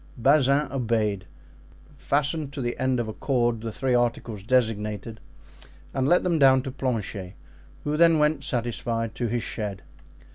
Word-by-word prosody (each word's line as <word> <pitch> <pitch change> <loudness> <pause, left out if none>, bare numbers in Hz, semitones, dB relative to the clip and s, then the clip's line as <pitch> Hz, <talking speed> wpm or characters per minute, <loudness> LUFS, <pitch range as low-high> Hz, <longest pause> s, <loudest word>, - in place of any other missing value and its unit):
Bazin 140 +3 +3
obeyed, 110 -7 -1 0.6
fastened 145 +1 -1
to 140 - -4
the 120 0 -2
end 130 -1 +1
of 120 - -2
a 110 - -5
cord 120 -4 0
the 115 0 -4
three 130 +3 -1
articles 120 -3 0
designated 110 -2 -1 0.7
and 135 0 0
let 175 +4 +4
them 170 -3 +1
down 130 -2 +5
to 135 - -5
Planchet, 110 -8 -3 0.5
who 150 0 -1
then 165 -1 +5
went 150 -1 +2
satisfied 115 -2 -2
to 120 - -2
his 120 +1 -1
shed. 105 -4 -5
120 Hz, 150 wpm, -25 LUFS, 110-140 Hz, 0.7 s, down